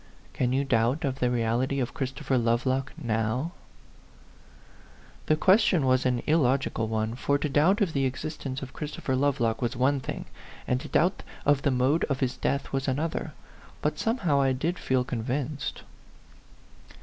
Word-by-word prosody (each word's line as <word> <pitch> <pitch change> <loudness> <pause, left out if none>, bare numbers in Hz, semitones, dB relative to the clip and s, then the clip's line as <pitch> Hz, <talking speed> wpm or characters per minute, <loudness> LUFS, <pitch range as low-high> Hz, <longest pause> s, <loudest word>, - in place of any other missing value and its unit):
Can 125 -1 0
you 135 +2 +1
doubt 120 +4 +1
of 135 -1 -2
the 125 - +2
reality 120 +3 0
of 125 - -2
Christopher 135 -2 -2
Lovelock 130 +3 +1
now 120 +3 -1 0.8
?" - - -25
The 155 - +4
question 185 -3 +4
was 130 0 +3
an 125 -1 0
illogical 135 -6 +2
one, 110 0 -1
for 140 +3 +1
to 145 - -1
doubt 155 +9 +3
of 180 -6 +1
the 135 -1 +1
existence 135 0 -4
of 135 - -8
Christopher 145 -3 -3
Love 140 +1 +1
lock 115 -1 0
was 120 -1 -1
one 135 +3 +2
thing, - - -5 0.4
and 125 +1 +1
to 155 - -7
doubt 180 +5 +2 0.2
of 145 -1 +4
the 140 - +2
mode 130 +5 +2
of 140 -2 -2
his 130 -2 0
death 140 +2 -2
was 135 0 -1
another; 150 +5 -2 0.5
but 150 0 0
somehow 180 - +1
I 135 -1 +3
did 165 +7 -2
feel 130 -1 +1
convinced. 130 +4 -3
135 Hz, 165 wpm, -27 LUFS, 125-145 Hz, 0.8 s, The